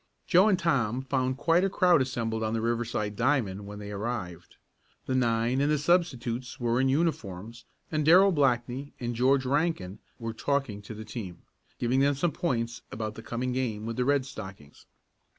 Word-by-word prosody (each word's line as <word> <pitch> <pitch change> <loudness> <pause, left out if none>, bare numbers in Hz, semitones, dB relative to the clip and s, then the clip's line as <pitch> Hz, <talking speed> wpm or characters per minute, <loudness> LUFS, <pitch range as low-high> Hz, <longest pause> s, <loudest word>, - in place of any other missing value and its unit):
Joe 185 +2 +5
and 190 - +3
Tom 130 -8 0
found 130 -1 -1
quite 165 +4 +3
a 195 - +2
crowd 180 -5 +4
assembled 115 -4 -2
on 110 0 -1
the 115 - -1
Riverside 115 -2 -1
diamond 105 -6 0
when 105 0 -8
they 105 0 -7
arrived. 100 -5 -5 0.5
The 130 - -2
nine 120 +1 +1
and 145 +1 +2
the 150 - +3
substitutes 130 -7 0
were 120 +1 +1
in 135 - +2
uniforms, 115 - -2 0.3
and 155 -1 0
Darrell 185 +6 +7
Blackney 135 -2 0
and 120 -1 -3
George 130 +3 +3
Rankin 135 - -1 0.2
were 115 -1 -5
talking 135 -4 -1
to 105 +2 -9
the 110 +1 -8
team, 105 -5 -7 0.3
giving 125 +2 +1
them 140 +1 +3
some 160 +5 0
points 120 -10 -2
about 110 -1 -4
the - - -9
coming 125 +2 -3
game 115 -5 -2
with 115 0 -3
the 125 - 0
Red 140 0 +2
Stockings. 95 - -10
125 Hz, 180 wpm, -28 LUFS, 110-140 Hz, 0.5 s, Darrell